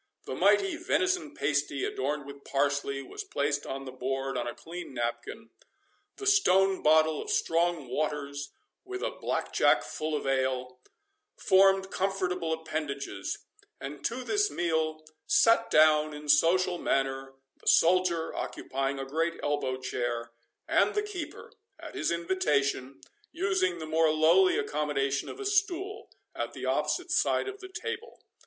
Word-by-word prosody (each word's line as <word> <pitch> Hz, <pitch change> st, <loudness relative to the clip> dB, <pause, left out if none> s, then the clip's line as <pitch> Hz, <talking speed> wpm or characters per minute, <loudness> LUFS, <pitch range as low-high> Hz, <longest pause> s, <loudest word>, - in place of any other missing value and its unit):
The -, -, -5 dB
mighty 390 Hz, -4 st, +3 dB
venison 355 Hz, -3 st, 0 dB
pasty, 145 Hz, -1 st, 0 dB
adorned 145 Hz, +2 st, -2 dB
with 140 Hz, 0 st, -11 dB
parsley, 140 Hz, -1 st, -1 dB
was -, -, -7 dB
placed 145 Hz, 0 st, -1 dB
on 135 Hz, 0 st, -5 dB
the 130 Hz, -, -7 dB
board 135 Hz, +1 st, -3 dB
on -, -, -2 dB
a 120 Hz, -, -5 dB
clean 170 Hz, -4 st, -8 dB
napkin; 120 Hz, -, -4 dB, 0.6 s
the 405 Hz, -, -8 dB
stone 195 Hz, -, +4 dB
bottle 155 Hz, 0 st, +4 dB
of -, -, -8 dB
strong 165 Hz, -3 st, +1 dB
waters, 145 Hz, +1 st, -3 dB, 0.3 s
with 380 Hz, -1 st, -6 dB
a -, -, -1 dB
blackjack -, -, +1 dB
full 155 Hz, 0 st, -3 dB
of 145 Hz, -, -3 dB
ale, 130 Hz, -1 st, -1 dB, 0.6 s
formed 190 Hz, 0 st, +4 dB
comfortable 185 Hz, -3 st, -1 dB
appendages; 145 Hz, -9 st, -4 dB, 0.3 s
and 140 Hz, +1 st, -7 dB
to 250 Hz, +2 st, -2 dB
this 410 Hz, +8 st, +1 dB
meal 160 Hz, -2 st, -1 dB, 0.2 s
sate 230 Hz, 0 st, +4 dB
down 155 Hz, -1 st, +4 dB
in 150 Hz, 0 st, -9 dB
social 175 Hz, +4 st, +3 dB
manner 135 Hz, 0 st, -1 dB, 0.2 s
the -, -, -15 dB
soldier, 170 Hz, -1 st, +3 dB
occupying 135 Hz, +1 st, -3 dB
a 135 Hz, -, -4 dB
great 165 Hz, +5 st, -1 dB
elbow 145 Hz, -3 st, -1 dB
chair, 120 Hz, -2 st, -3 dB, 0.4 s
and -, -, +3 dB
the 420 Hz, -, +1 dB
keeper, 370 Hz, -7 st, -7 dB, 0.3 s
at -, -, -9 dB
his 390 Hz, -, -1 dB
invitation, 145 Hz, -6 st, 0 dB, 0.3 s
using 185 Hz, -2 st, 0 dB
the 160 Hz, -, -6 dB
more 160 Hz, 0 st, +3 dB
lowly 165 Hz, -, +4 dB
accommodation 145 Hz, -, -1 dB
of -, -, -8 dB
a 410 Hz, -, -5 dB
stool, 395 Hz, 0 st, -1 dB, 0.2 s
at -, -, -4 dB
the -, -, -6 dB
opposite 360 Hz, -1 st, 0 dB
side 350 Hz, -, +2 dB
of 395 Hz, 0 st, -6 dB
the 380 Hz, -2 st, -10 dB
table. 460 Hz, +3 st, -6 dB
155 Hz, 145 wpm, -29 LUFS, 140-195 Hz, 0.6 s, stone